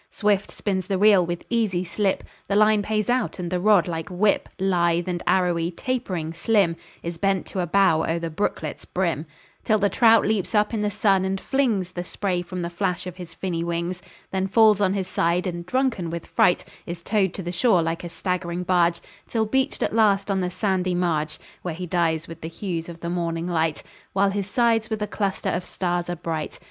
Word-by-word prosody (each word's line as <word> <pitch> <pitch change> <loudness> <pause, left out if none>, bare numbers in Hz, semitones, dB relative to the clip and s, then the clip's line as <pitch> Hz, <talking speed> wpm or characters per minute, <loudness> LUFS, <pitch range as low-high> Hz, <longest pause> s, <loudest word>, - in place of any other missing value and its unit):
Swift 205 -2 +1
spins 190 -3 -2
the 195 - 0
reel; 200 -2 +6
with 175 0 -4
easy 215 -7 0
slip 195 +2 0 0.2
The 200 - 0
line 215 0 +5
pays 215 0 -1
out, 250 +1 0
and 175 -2 -4
the 180 - 0
rod 200 -2 +4
like 165 +1 -4
a 180 - -7
whip, 205 +3 +2
Lithe 175 -2 +1
and 175 -1 -2
arrowy, 175 -2 +2
tapering, 180 -6 -3
slim, 175 0 +2 0.3
Is 170 -1 -5
bent 195 0 +1
to 190 - -4
a 175 - 0
bow 185 -3 +4
o'er 165 +1 0
the 165 -1 -4
brooklet's 200 +7 -3
brim, 170 -4 -2 0.4
Till 215 - +3
the 205 -1 +2
trout 230 -2 +5
leaps 215 +1 0
up 210 +2 +2
in 220 - 0
the 210 - +1
sun, 200 -2 +2
and 190 0 -1
flings 225 -10 0
The 175 -1 -4
spray 180 -1 -2
from 180 0 -5
the 170 - -4
flash 180 0 -1
of 180 -1 -7
his 170 -3 -9
finny 170 -2 -2
wings; 170 +1 -2 0.3
Then 190 0 0
falls 215 0 +5
on 195 -1 +2
his 190 -2 -2
side, 175 0 +1
and, 175 -1 -4
drunken 255 -8 0
with 170 0 -5
fright, 180 - +2 0.2
Is 170 0 -6
towed 195 -3 +1
to 190 - -5
the 175 - -3
shore 180 -1 +3
like 165 +1 -2
a 175 - -5
staggering 180 0 -2
barge, 175 -1 +2 0.3
Till 225 -2 0
beached 265 +5 0
at - - -1
last 205 -3 +3
on 190 -1 +1
the 180 - -1
sandy 185 -1 0
marge, 160 -4 0 0.2
Where 175 -3 -4
he 180 +2 -5
dies 165 -2 0
with 165 0 -10
the 160 - -4
hues 165 -1 -4
of 170 -1 -10
the 170 - -3
morning 170 -1 -2
light, 160 -3 0 0.3
While 195 0 +3
his 200 0 -3
sides 230 -1 +2
with 215 -1 -2
a - - -2
cluster 200 -2 -2
of 180 - -1
stars 175 -1 -2
are 175 - -1
bright. 160 -2 -4
185 Hz, 215 wpm, -24 LUFS, 170-205 Hz, 0.4 s, reel